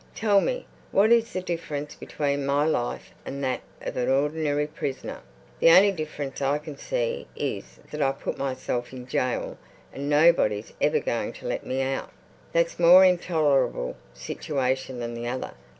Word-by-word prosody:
"Tell 205 Hz, -2 st, +3 dB
me, -, -, -2 dB, 0.3 s
what 210 Hz, +4 st, +4 dB
is 230 Hz, -1 st, +4 dB
the 185 Hz, -, -3 dB
difference 150 Hz, -4 st, -4 dB
between 140 Hz, -1 st, -2 dB
my 140 Hz, +2 st, +2 dB
life 120 Hz, -6 st, -1 dB
and 140 Hz, +1 st, -5 dB
that 130 Hz, -1 st, -1 dB, 0.2 s
of -, -, -4 dB
an 125 Hz, -, 0 dB
ordinary 145 Hz, +2 st, +1 dB
prisoner. 140 Hz, -3 st, -5 dB, 0.4 s
The -, -, +6 dB
only 195 Hz, +4 st, +8 dB
difference 150 Hz, -6 st, -5 dB
I 140 Hz, +1 st, +2 dB
can 150 Hz, 0 st, -8 dB
see -, -, -2 dB
is -, -, -4 dB
that 150 Hz, -, -4 dB
I 135 Hz, -1 st, +3 dB
put -, -, -5 dB
myself 130 Hz, -2 st, -3 dB
in 125 Hz, -1 st, -8 dB
jail 125 Hz, 0 st, -2 dB, 0.3 s
and 140 Hz, +1 st, -4 dB
nobody's 145 Hz, -9 st, +3 dB
ever -, -, +3 dB
going -, -, -2 dB
to -, -, -8 dB
let -, -, -3 dB
me 130 Hz, +1 st, 0 dB
out. 135 Hz, 0 st, -3 dB, 0.4 s
That's 170 Hz, 0 st, +1 dB
a -, -, -3 dB
more 180 Hz, +3 st, +9 dB
intolerable 150 Hz, -, +2 dB, 0.2 s
situation 130 Hz, -, -2 dB
than 120 Hz, 0 st, -4 dB
the 120 Hz, 0 st, -5 dB
other. 125 Hz, +1 st, -3 dB
145 Hz, 165 wpm, -26 LUFS, 130-170 Hz, 0.4 s, more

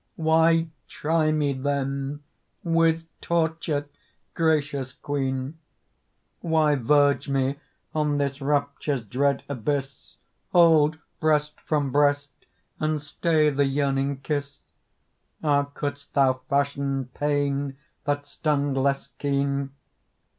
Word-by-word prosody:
Why 165 Hz, +1 st, +3 dB, 0.2 s
try 155 Hz, 0 st, +1 dB
me, 150 Hz, -2 st, +1 dB
then, 140 Hz, +1 st, -2 dB, 0.4 s
with 165 Hz, -1 st, +2 dB, 0.2 s
torture, 160 Hz, -3 st, 0 dB, 0.5 s
gracious 145 Hz, -5 st, 0 dB
Queen? 135 Hz, +2 st, -3 dB, 0.8 s
Why 160 Hz, -3 st, +2 dB
verge 145 Hz, +2 st, +3 dB
me 135 Hz, +1 st, 0 dB, 0.3 s
on 150 Hz, -2 st, +1 dB
this 140 Hz, -1 st, -2 dB
rapture's 140 Hz, -2 st, -1 dB
dread 135 Hz, +5 st, 0 dB
abyss, 140 Hz, +1 st, -4 dB, 0.4 s
Hold 160 Hz, -3 st, +5 dB, 0.2 s
breast 150 Hz, -1 st, +1 dB
from 145 Hz, -3 st, 0 dB
breast 145 Hz, 0 st, +2 dB, 0.5 s
and 155 Hz, 0 st, 0 dB
stay 155 Hz, +1 st, +1 dB
the 140 Hz, 0 st, +2 dB
yearning 135 Hz, 0 st, 0 dB
kiss? 145 Hz, -1 st, -3 dB, 0.8 s
Ah, 145 Hz, -2 st, +3 dB
couldst 140 Hz, 0 st, -6 dB
thou 130 Hz, -2 st, +3 dB
fashion 140 Hz, -2 st, 0 dB
pain 145 Hz, -1 st, -1 dB, 0.3 s
that 145 Hz, 0 st, -1 dB
stung 145 Hz, -1 st, 0 dB
less 135 Hz, +1 st, +1 dB
keen? 140 Hz, -1 st, 0 dB
145 Hz, 100 wpm, -25 LUFS, 140-150 Hz, 0.8 s, Hold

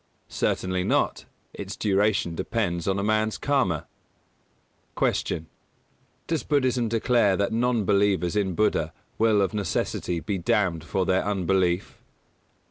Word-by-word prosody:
Certainly 95 Hz, -1 st, -1 dB
not. -, -, 0 dB, 0.3 s
Its -, -, -6 dB
duration 100 Hz, -3 st, +1 dB
depends 90 Hz, -1 st, -2 dB
on 95 Hz, 0 st, +1 dB
a 100 Hz, -, -1 dB
man's 110 Hz, +1 st, +1 dB
Karma. 115 Hz, -, 0 dB, 1.1 s
223. 80 Hz, -, 0 dB
Q. -, -, -31 dB, 0.8 s
_Does 160 Hz, -6 st, -2 dB
Buddhism 130 Hz, -5 st, +1 dB
declare 115 Hz, -3 st, +2 dB
that 100 Hz, +2 st, 0 dB
non 120 Hz, -2 st, +1 dB
believers 100 Hz, -2 st, +2 dB
in 95 Hz, -4 st, 0 dB
Buddha 80 Hz, -6 st, +1 dB, 0.3 s
will 110 Hz, -2 st, +4 dB
of 95 Hz, -, -1 dB
necessity 95 Hz, -4 st, -2 dB
be 95 Hz, +3 st, -3 dB
damned 85 Hz, -2 st, +1 dB
for 90 Hz, +4 st, -1 dB
their 95 Hz, +1 st, +2 dB
unbelief? 95 Hz, -2 st, 0 dB
100 Hz, 125 wpm, -25 LUFS, 90-110 Hz, 1.1 s, will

